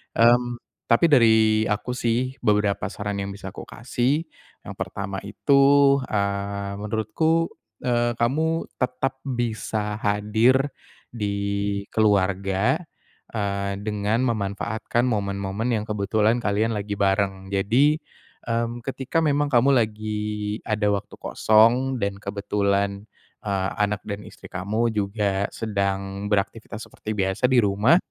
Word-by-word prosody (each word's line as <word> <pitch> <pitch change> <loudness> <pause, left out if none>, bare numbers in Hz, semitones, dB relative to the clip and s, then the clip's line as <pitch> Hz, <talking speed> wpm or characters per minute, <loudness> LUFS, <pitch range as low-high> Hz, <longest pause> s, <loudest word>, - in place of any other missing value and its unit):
Mmm, 120 +1 +3 0.3
tapi 120 +8 +4
dari 110 -4 +5
aku 105 +4 -2
sih 125 +3 0
beberapa 105 -2 +2
saran 105 -1 -4
yang 100 0 -4
bisa 95 -1 -7
aku - - -9
kasih 125 +6 -1 0.4
yang - - -8
pertama 100 -1 -4
itu, 140 +5 +4
eee, 100 -1 -2
menurutku, 115 +11 0 0.3
eee, 120 -1 +1
kamu 160 +7 0
tetap 130 +1 -1
bisa 110 -4 -2
hadir 110 +7 +2 0.4
di 100 -2 -1
keluarga, 100 +3 +2 0.6
eee, 100 -2 -1
dengan 105 +2 0
memanfaatkan 110 +1 -1
momen-momen 100 0 -1
yang 110 -2 0
kebetulan 105 +2 +1
kalian 110 +1 +1
lagi 105 0 -3
bareng. 95 -1 0
Jadi, 125 +10 +3 0.5
mmm, 115 0 -2
ketika 135 +3 -1
memang 145 -2 +1
kamu 130 +3 +5
lagi 105 -2 -2
ada 105 -1 0
waktu 100 - -4
kosong 120 +5 +3
dan 100 0 -1
kebetulan, 100 0 -1 0.4
eee, 100 -2 0
anak 105 -1 0
dan 100 -1 -5
istri - - -12
kamu 110 +5 -1
juga 100 -1 0
sedang 100 -2 -2
beraktivitas 105 +2 -2
seperti 110 - -7
biasa 95 +5 +1
di 130 - +6
rumah. 105 - +4
105 Hz, 115 wpm, -24 LUFS, 100-120 Hz, 0.6 s, di